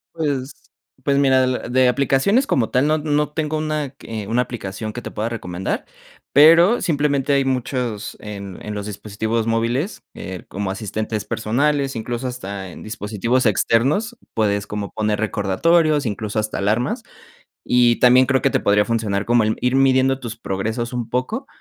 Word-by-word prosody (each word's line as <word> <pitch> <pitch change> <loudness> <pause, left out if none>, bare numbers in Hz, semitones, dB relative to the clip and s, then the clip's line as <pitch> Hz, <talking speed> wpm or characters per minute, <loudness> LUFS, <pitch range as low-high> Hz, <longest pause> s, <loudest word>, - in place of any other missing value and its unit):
Pues, 145 -4 -2 0.5
pues 140 -1 +2
mira, 135 -2 +4
de 130 - +2
la 130 - 0
de 130 +1 +4
aplicaciones 140 - +2
como 115 -4 +1
tal, 130 +4 +2
no 155 +1 +3
no 150 -1 0
tengo 155 0 -2
una 155 -3 -2
que 110 -6 -7
una 115 +3 +2
aplicación 110 -3 -5
que 120 - -7
te - - -6
pueda 110 +2 -2
recomendar, 95 -5 -4 0.5
pero 165 +9 +7
simplemente, 145 -3 +1
hay 135 -1 +2
muchos 125 -4 -2
en 100 -3 -7
en 105 - -4
los 105 -1 -4
dispositivos 110 +2 -3
móviles, 120 - -1
eh, 95 -1 -7
como 95 0 -3
asistentes 110 +1 -3
personales, 135 +4 0
incluso, 120 +3 -3
hasta 100 -6 -6
en - - -11
dispositivos 115 +3 -1
externos 135 - +2 0.2
puedes 100 -2 0
como 105 -1 -4
poner 105 -1 -1
recordatorios, 145 - +2
incluso 105 0 -2
hasta 110 0 -2
alarmas. 110 +5 0 0.7
Y 120 -1 +4
también 125 +1 +6
creo 130 -1 +1
que - - +3
te - - +1
podría 105 +1 +3
funcionar 105 -3 -1
como, 120 0 +3
el 110 0 0
ir 125 +1 +1
midiendo 135 0 +3
tus 115 -2 -6
progresos 110 +4 -3
un 120 -2 -3
poco 215 - -2
120 Hz, 165 wpm, -21 LUFS, 105-140 Hz, 0.7 s, pero